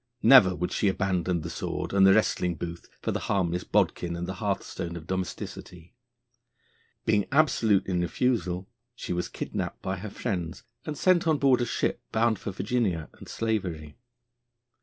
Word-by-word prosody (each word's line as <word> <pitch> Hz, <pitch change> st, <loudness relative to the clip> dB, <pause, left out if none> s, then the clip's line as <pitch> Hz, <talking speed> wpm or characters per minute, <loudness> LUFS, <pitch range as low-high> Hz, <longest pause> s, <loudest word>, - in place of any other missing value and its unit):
Never 95 Hz, -9 st, +8 dB
would 90 Hz, +1 st, -2 dB
she 105 Hz, -, +1 dB
abandon 95 Hz, -3 st, 0 dB
the 80 Hz, -, -5 dB
sword -, -, -4 dB
and 95 Hz, -1 st, +6 dB
the 95 Hz, -, +7 dB
wrestling 90 Hz, -5 st, +1 dB
booth 85 Hz, +2 st, -7 dB
for -, -, 0 dB
the -, -, -2 dB
harmless 90 Hz, -3 st, 0 dB
bodkin 85 Hz, -1 st, 0 dB
and 85 Hz, +1 st, -3 dB
the 95 Hz, -, -4 dB
hearthstone 95 Hz, -4 st, -3 dB
of 80 Hz, -, -9 dB
domesticity. 90 Hz, -1 st, -6 dB, 1.1 s
Being 105 Hz, -2 st, +2 dB
absolute 115 Hz, -9 st, +3 dB
in 90 Hz, -2 st, 0 dB
refusal, 95 Hz, -2 st, 0 dB, 0.3 s
she 90 Hz, -, -4 dB
was 90 Hz, 0 st, -2 dB
kidnapped -, -, -5 dB
by 95 Hz, +1 st, -2 dB
her 105 Hz, +4 st, -6 dB
friends 90 Hz, -5 st, -4 dB, 0.2 s
and 150 Hz, -2 st, -3 dB
sent 180 Hz, 0 st, +3 dB
on 155 Hz, -2 st, +3 dB
board 135 Hz, -3 st, +4 dB
a -, -, +1 dB
ship, -, -, -1 dB
bound 110 Hz, -2 st, +2 dB
for -, -, -5 dB
Virginia 95 Hz, -4 st, -1 dB
and -, -, -13 dB
slavery. 90 Hz, -10 st, -3 dB
95 Hz, 160 wpm, -27 LUFS, 85-110 Hz, 1.1 s, Never